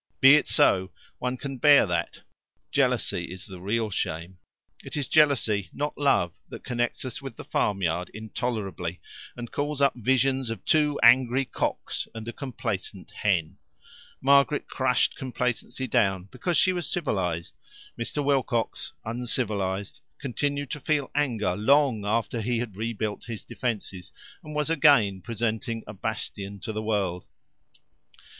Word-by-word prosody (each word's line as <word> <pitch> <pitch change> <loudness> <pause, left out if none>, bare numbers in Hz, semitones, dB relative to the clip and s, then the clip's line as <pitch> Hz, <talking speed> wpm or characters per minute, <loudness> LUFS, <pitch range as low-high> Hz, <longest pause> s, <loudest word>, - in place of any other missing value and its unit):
Be 135 +1 +9
it 150 - +5
so: 95 -11 +4 0.3
one 125 0 -2
can 135 0 -5
bear 145 +2 +7
that; 85 -3 -2 0.5
jealousy - - +1
is 90 0 -9
the 95 -4 -10
real 110 +3 -1
shame. 90 0 -3 0.4
It - - -6
is 140 - -1
jealousy, 130 -10 +3
not 145 +1 -2
love, 135 - +2 0.2
that - - -9
connects 120 +1 -1
us 130 +2 -5
with 135 -4 -7
the - - -8
farmyard 90 -3 0
intolerably, 105 -5 -4 0.4
and 120 -1 -7
calls 145 0 -2
up 140 -1 +4
visions 130 +1 +1
of 115 - -6
two 150 -2 +3
angry 125 +2 +6
cocks - - -2
and 110 0 -7
a 120 - -4
complacent 110 -8 -5
hen. 90 -7 0 0.6
Margaret 140 +2 +4
crushed 130 -2 +1
complacency 125 0 -2
down 95 -6 +2
because 175 -3 -1
she 185 - +4
was 175 -5 -3
civilized. 90 - -1 0.4
Mr. 140 +5 -3
Wilcox, 130 -5 0
uncivilized, 110 -1 -2 0.2
continued 140 +1 -2
to 150 - -3
feel 145 0 0
anger 115 -11 0
long 115 -1 +3
after 115 +2 0
he 120 +2 0
had 115 -4 -4
rebuilt 110 -1 -3
his 115 -3 -6
defences, 105 -7 -4 0.3
and 150 0 -8
was 150 -1 0
again 140 -12 +4
presenting 115 0 -2
a 105 - -8
bastion 100 -1 -4
to 110 - -4
the 110 - -2
world. 100 -5 -1
115 Hz, 140 wpm, -26 LUFS, 100-135 Hz, 0.6 s, Be